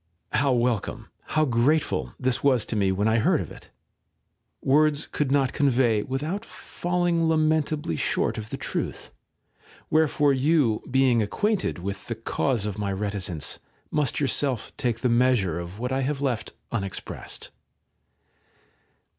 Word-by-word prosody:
How 140 0 +2
welcome, 120 -4 0 0.2
how 155 0 +2
grateful 135 +5 +1
this 130 -1 0
was 130 -6 +3
to - - -3
me 100 -2 +2
when 100 +3 +1
I 110 +1 +3
heard - - +3
of - - -5
it, - - -13 0.9
words 150 +2 +3
could 145 -3 -2
not 135 -2 +2
convey 125 -6 +3
without 150 - -3
falling 175 -2 -1
lamentably 155 - +1
short 75 - 0
of 105 0 -7
the - - -4
truth; - - -4 0.8
wherefore 150 -2 +3
you, 135 -5 +2
being 130 -3 +3
acquainted 205 - 0
with 100 +3 -5
the 115 - -2
cause 115 0 -1
of 105 -1 -4
my 100 -1 -1
reticence, 95 -5 -2 0.3
must 150 -3 +1
yourself 135 -3 0
take 115 -2 -1
the 125 - +2
measure 120 -8 +2
of 85 +3 -7
what 125 +3 -3
I 135 +1 +1
have 140 +1 -1
left 130 -5 -2 0.2
unexpressed. 100 -4 -4
130 Hz, 140 wpm, -25 LUFS, 110-150 Hz, 0.9 s, was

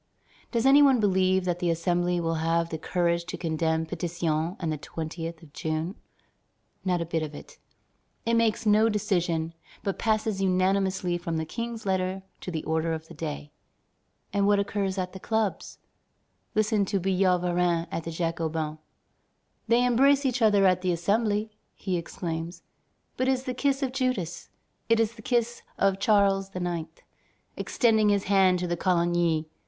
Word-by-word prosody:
Does 235 0 0
any 275 +2 +7
one 270 -4 +5
believe 190 -2 +2
that 175 -1 -1
the 175 - 0
Assembly 175 +1 +1
will 165 -1 -1
have 165 +1 +1
the 160 - -4
courage 170 0 0
to 180 - -5
condemn 160 -1 0
Pétion 170 0 -2
and 165 -3 -2
the - - -3
20th 165 +1 -6
of 145 -3 -16
June? 160 +3 -2 0.9
Not 180 -2 0
a - - -1
bit 165 0 -1
of 150 -1 -5
it. - - -12 0.7
It 230 - +1
makes 230 -1 +2
no 215 +1 +5
decision, 175 -6 0 0.3
but 195 - -2
passes 215 -2 0
unanimously 185 -1 +1
from 165 -1 -3
the 160 - -2
King's 230 +4 -5
letter 190 0 -1 0.2
to - - -7
the 160 -3 -3
order 160 +1 0
of 160 0 -6
the - - -10
day. 150 -2 -6 0.8
And 200 -1 +2
what 205 0 +4
occurs 200 -1 -1
at 185 -1 -3
the 190 - -8
clubs? 220 -1 -2 0.8
Listen 215 -1 +2
to 195 0 -1
Billaud 185 0 +2
Varennes 175 -1 +1
at 165 - -3
the 165 - -5
Jacobins: 160 -2 -2 0.9
"They 235 +2 +4
embrace 275 +3 +4
each 255 -1 0
other 205 -3 +5
at 185 -1 +3
the 185 -1 +1
Assembly," 210 +5 0 0.2
he 185 -2 -2
exclaims; 170 0 -5 0.6
"it 255 - +1
is 260 -1 +1
the 255 -2 -3
kiss 275 +1 0
of 260 - -1
Judas, 235 -11 -2 0.4
it 230 0 +4
is 225 0 +1
the 220 - -13
kiss 240 0 0 0.2
of 195 -1 +2
Charles 195 -2 +3
IX., 175 -3 -3 0.7
extending 220 -3 +2
his 200 -1 +2
hand 190 -2 +4
to 175 -1 -1
Coligny. 170 -3 +1
185 Hz, 165 wpm, -27 LUFS, 165-210 Hz, 0.9 s, any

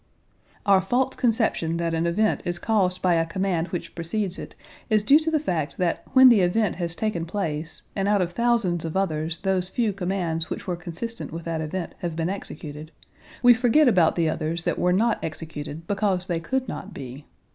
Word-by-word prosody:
Our 195 -2 +5
false 250 +7 0
conception 225 -9 +1
that 170 -1 -1
an 165 +1 +1
event 215 +6 +1
is 175 0 -1
caused 185 -2 0
by 180 -1 +4
a 165 -1 +3
command 180 -1 -1
which 175 - -5
precedes 185 +3 -2
it - - -9 0.3
is 215 -2 +3
due 280 +8 +6
to 320 0 -1
the 320 - +2
fact 165 - -2
that 180 -3 0
when 260 0 +9
the 235 -4 +6
event 185 +2 +1
has 170 -2 -3
taken 215 -6 -1
place 165 -3 -3
and 195 0 0
out 205 0 +3
of 175 -2 0
thousands 230 -6 +1
of 165 +2 -3
others 160 -3 -1
those 190 -1 0
few 220 -1 0
commands 180 -4 -2
which - - -5
were 180 - -2
consistent 175 +7 -6
with 165 0 -7
that 165 -1 -2
event 170 +3 -4
have 175 -3 -3
been 165 +1 -1
executed, 155 -5 -7 0.5
we 245 0 +9
forget 250 +5 +4
about 180 -9 +4
the 170 -2 +1
others 160 +1 -2
that - - -1
were 180 - +2
not 220 +5 +1
executed 155 0 -6
because 195 -2 0
they 175 -3 -1
could 260 +9 -2
not 200 -1 -7
be. 135 +2 -8
180 Hz, 200 wpm, -25 LUFS, 165-215 Hz, 0.5 s, when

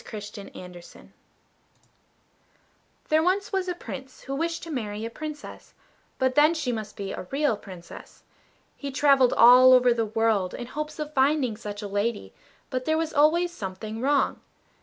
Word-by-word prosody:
THE - - -14
REAL 205 -1 -8
PRINCESS 175 -1 -13 2.0
There 310 +1 +4
was 385 +4 0
once 380 -1 0
a 360 - -2
Prince 265 -6 -9
who 270 - -6
wished 330 +4 -2
to 335 - -7
marry 215 -5 -4
a 230 - -5
Princess; 305 +3 -9 0.4
but 260 0 +1
then 300 +4 +5
she 290 -6 -2
must 215 -3 -6
be 195 -1 -5
a 185 - -7
real 285 -3 +1
Princess. 185 -4 -12 0.5
He 280 - -6
travelled 275 -2 +4
all 250 +2 +8
over 250 -1 +5
the 230 -2 -1
world 220 -4 0
in 240 - -6
hopes 300 +4 -6
of 305 -1 -5
finding 270 -4 +2
such 210 -1 -7
a - - -4
lady; 205 +2 -2 0.4
but 255 -1 -2
there 315 0 +1
was 325 0 -2
always 335 +4 +3
something 215 - -6
wrong. 280 +1 +1
255 Hz, 165 wpm, -26 LUFS, 215-305 Hz, 2.0 s, all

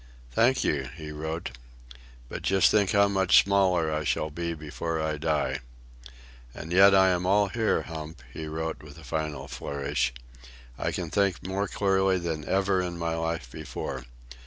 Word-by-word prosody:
"Thank 120 - +3
you," 70 -3 0
he 80 -2 -7
wrote. 80 +1 -4 0.8
"But - - -6
just 95 -1 +4
think 105 -3 +3
of - - 0
how 100 - +5
much 95 -2 +5
smaller 90 -5 +2
I 75 0 -1
shall 75 +1 -1
be 85 +2 -3
before 80 +2 -4
I 80 -1 -1
die." 75 -4 0 1.0
"And 80 - -7
yet 95 +2 +7
I 95 0 +6
am 90 0 0
all 100 +1 +3
here, 110 +2 +1
Hump," 80 -4 -8
he 80 -1 -6
wrote 80 +1 -4
with 75 0 -13
a 80 - -12
final 75 +1 -3
flourish. 70 -2 -2 0.6
"I - - -2
can - - -4
think 100 -4 +1
more 95 +2 -1
clearly 95 -1 +2
than 80 -3 -3
ever 95 0 +2
in 90 -1 -4
my 85 -1 -1
life 80 -6 -3
before. 65 -1 -6
80 Hz, 170 wpm, -27 LUFS, 75-95 Hz, 1.0 s, yet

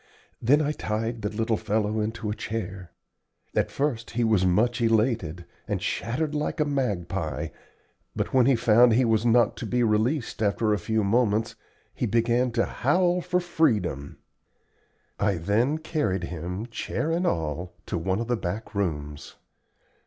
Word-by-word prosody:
Then 145 +6 +4
I 145 - 0
tied 115 -3 -3
the 105 - -1
little 110 +1 0
fellow 105 +1 0
into 110 0 -2
a - - -3
chair. 105 -4 -5 0.6
At - - +1
first 135 -6 -2
he 120 0 -1
was 105 -5 +3
much 115 +7 +2
elated, 110 -7 +1 0.2
and - - -1
chattered 150 +6 -2
like 150 +2 -2
a 150 - +3
magpie, 95 - -2 0.7
but - - -2
when 130 -1 +5
he 135 - +5
found 120 0 +5
he 125 +3 +4
was 115 0 +2
not 120 +1 +4
to - - -5
be 125 0 +1
released 115 +4 0
after 105 +1 +2
a 105 - 0
few 110 -1 0
moments 110 +1 +1 0.4
he - - -2
began 120 +2 +2
to 115 0 +2
howl 175 +6 +1
for 180 +1 0
freedom. 105 - 0 1.0
I 100 -1 +2
then 110 - +1
carried 150 - -1
him, 90 +5 -4
chair 150 +6 -2
and 175 +2 +1
all, 80 - -2
to - - -3
one 95 +4 -1
of 115 - -3
the 120 - +1
back 105 +4 -5
rooms. 75 -7 -3
110 Hz, 160 wpm, -26 LUFS, 100-125 Hz, 1.0 s, when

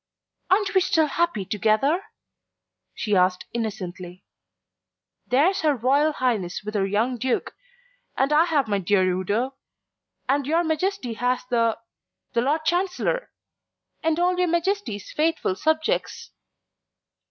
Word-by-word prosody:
"Aren't 395 +2 +2
we 380 - +4
still 320 -3 +3
happy 305 - -1
together?" 220 - +1 0.9
she 210 -3 0
asked 180 0 +2
innocently. 185 -5 -5 1.0
"There's 300 +10 +3
her 305 -3 +2
Royal 280 +6 +2
Highness 215 -10 -1
with 210 +1 -5
her 195 -2 +1
young 230 +5 0
Duke, 260 0 -1 0.6
and 275 +3 +2
I 315 +3 +5
have 300 -7 +1
my 200 -2 0
dear 190 +1 +2
Udo, 200 +8 -1 0.7
and 275 +1 +1
your 330 +3 +2
Majesty 320 - -1
has 245 +3 -1
the 230 -2 +2 0.6
the 235 - +2
Lord 305 +5 0
Chancellor 375 +8 0 0.7
and 320 0 +1
all 360 +1 +2
your 360 - +3
Majesty's 340 - -1
faithful 315 - 0
subjects." 315 - -1
265 Hz, 125 wpm, -24 LUFS, 210-325 Hz, 1.0 s, I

